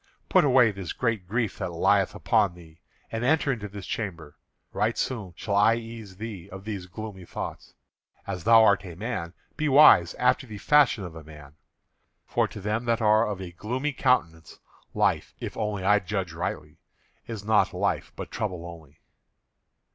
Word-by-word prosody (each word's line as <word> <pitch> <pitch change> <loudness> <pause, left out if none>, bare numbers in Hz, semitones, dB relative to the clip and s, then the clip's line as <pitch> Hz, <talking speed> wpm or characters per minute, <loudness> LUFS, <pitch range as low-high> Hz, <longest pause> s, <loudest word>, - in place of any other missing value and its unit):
Put - - +5
away 125 -5 +5
this 95 -4 -6
great 115 -7 -1
grief 115 +1 -2
that - - -2
lieth - - +2
upon 90 - +1
thee, 80 -2 -16 0.3
and 115 +1 -3
enter 150 +1 +2
into 110 -5 -4
this 100 -1 -9
chamber. 85 -9 -5 0.4
Right 105 +4 0
soon 105 -9 -3
shall 100 - -3
I 105 +3 +5
ease 115 -4 -8
thee 100 -4 -7
of 95 0 -10
these 100 -4 -5
gloomy 95 0 -8
thoughts. - - -7 0.5
As 95 -4 -5
thou 115 0 +7
art 100 -3 +4
a 90 -4 -9
man, 95 -4 -4 0.2
be 155 -1 0
wise 135 - +7
after 125 +1 +1
the 105 -2 -8
fashion 135 -2 +3
of 85 -3 -7
a 80 - -9
man; 75 -2 -13 0.7
for - - +1
to - - -10
them 105 +4 -2
that 115 -1 +1
are 110 0 +4
of 105 -3 -4
a 90 -2 -7
gloomy 125 +11 -3
countenance, 85 - 0 0.4
life, - - 0
if - - -6
only 105 -3 -2
I 105 +2 +4
judge 95 -3 -3
rightly, 75 -3 -5 0.5
is 110 -3 -6
not 110 0 +3
life - - -1
but - - -7
trouble 90 -5 -4
only." 80 -4 -12
105 Hz, 175 wpm, -26 LUFS, 90-115 Hz, 0.7 s, thou